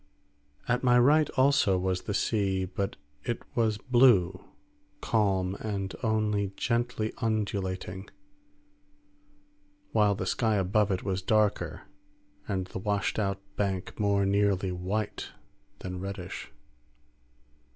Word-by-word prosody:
At 125 +1 +1
my 125 -1 +5
right 145 +5 +5
also 130 -8 +4
was 90 0 -1
the 105 - -3
sea, 95 -5 +1
but 95 +2 -3 0.3
it 120 - -3
was 110 -3 +1
blue, 120 -6 +4 0.6
calm, 95 -3 +1
and 100 -3 -3
only 105 -3 0
gently 115 -2 -1
undulating, 100 -4 -2 1.8
while 105 -2 +3
the 95 - -3
sky 110 +3 +1
above 100 +2 +2
it 95 -2 -1
was 95 -2 -1
darker 105 +1 +1 0.6
and 95 -3 -1
the 95 - -6
washed 100 +2 -1
out 100 -2 -1
bank 95 -1 -2
more 100 -1 +2
nearly 100 -1 +2
white 95 +4 -3 0.5
than 90 0 -5
reddish. 95 -1 -6
100 Hz, 110 wpm, -29 LUFS, 95-110 Hz, 1.8 s, my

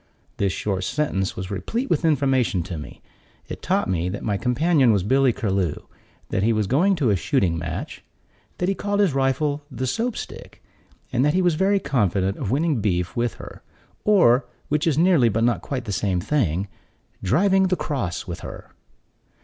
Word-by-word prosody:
This 100 -1 +1
short 95 -1 -2
sentence 100 -6 -1
was 95 +1 -6
replete 230 - -2
with - - 0
information 135 - +2
to 90 0 -6
me. 75 -1 -9 0.4
It - - -7
taught - - 0
me 90 -1 -1
that 100 - -5
my 105 - 0
companion 130 - +3
was 100 -4 +2
Billy 130 +5 +3
Curlew; 95 -8 -1 0.5
that - - 0
he 115 +3 +3
was 110 -1 +1
going 175 - +3
to 135 -10 +1
a - - +3
shooting 95 - +1
match; 80 -1 -5 0.5
that 180 - -1
he 195 - +2
called 205 +1 -2
his 195 -8 +3
rifle 140 +2 0
the 130 -2 -4
Soap 225 - -1
stick, - - -9 0.5
and 125 +1 +2
that 150 +3 +2
he 185 - +3
was 175 -2 +3
very 195 +5 +2
confident 100 - 0
of - - -3
winning 145 -1 +1
beef 90 -4 -1
with 120 -1 -1
her; - - -11 0.4
or, 145 - +4 0.2
which 150 +2 +1
is 150 -3 +2
nearly, 165 -8 +4
but 115 +2 0
not 120 0 +2
quite 130 -3 -4
the 105 - -4
same 95 -1 0
thing, 95 - 0 0.5
driving 190 - +3
the 185 - +1
cross 105 - -3
with 85 -2 -6
her. - - -9
125 Hz, 185 wpm, -23 LUFS, 95-155 Hz, 0.5 s, or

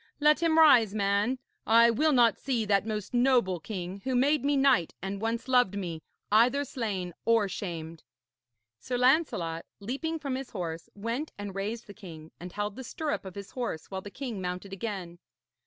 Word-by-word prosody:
Let 300 +1 +4
him 325 -1 +3
rise, 240 -10 +6
man. 205 +5 +1 0.3
I 230 +1 +6
will 305 +7 +2
not 240 -4 +4
see 245 -5 -1
that 200 +1 +2
most 210 -1 -4
noble 240 -8 +3
king, 185 +1 -6
who 260 -1 -1
made 280 +4 +3
me 285 0 +2
knight 265 - +3
and 195 +1 -5
once 225 +2 -2
loved 250 -6 +3
me, 170 -5 -4 0.3
either 250 +7 +4
slain 200 -9 -3
or 230 -3 +3
shamed.' 165 -4 -6 0.8
Sir 245 - -3
Lancelot, 250 - +2 0.2
leaping 280 +10 -3
from 285 -4 -4
his 260 0 -4
horse, 165 -4 -5
went 230 +9 -3
and 205 -1 -6
raised 210 +4 -4
the 205 - -11
king, 165 -7 -11
and 180 +1 -8
held 205 +1 -3
the 260 - -6
stirrup 300 - -3
of 190 - -8
his 200 -1 -8
horse 235 -12 -4
while 190 0 -4
the 205 - -9
king 235 -4 -5
mounted 180 +2 -5
again. 190 -4 -5
215 Hz, 180 wpm, -29 LUFS, 190-260 Hz, 0.8 s, rise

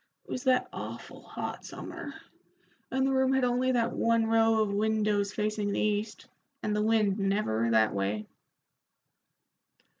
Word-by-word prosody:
It - - -12
was 255 - -4
that 255 -1 +3
awful - - -7
hot - - -6
summer, - - -8 0.7
and 265 0 +1
the 270 - +1
room 265 0 +3
had 265 -1 +2
only 250 +1 +2
that 235 -1 +1
one 230 -1 +2
row 225 0 +3
of 200 -1 -2
windows 210 -1 +1
facing 210 -1 -1
the - - -1
east, 210 +1 -1 0.4
and 210 0 0
the 210 - +1
wind 215 -2 +2
never 195 - 0
that 110 -1 +3
way." 100 +2 -2
215 Hz, 150 wpm, -29 LUFS, 200-230 Hz, 0.7 s, that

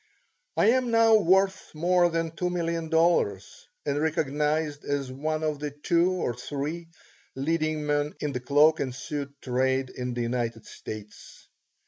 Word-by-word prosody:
I 225 - +5
am 255 -1 +1
now 230 -1 +5
worth 190 -1 +3
more 175 +2 +3
than 165 -1 -1
two 180 +2 -2
million 170 -2 -2
dollars 160 - +1 0.2
and 145 +1 0
recognized 150 -1 0
as 140 -2 -2
one 155 +4 -2
of 155 -2 -1
the 150 0 -3
two 170 +5 +1
or 175 -9 -1
three 145 +7 -5 0.5
leading 155 +2 -1
men 145 0 0
in 150 - -2
the 125 - -3
cloak 150 +5 +4
and 130 -2 -2
suit 140 +1 -6
trade 130 +1 0
in 125 -1 -4
the 120 - -2
United 115 -2 -2
States. 105 -1 -10
150 Hz, 150 wpm, -27 LUFS, 135-165 Hz, 0.5 s, I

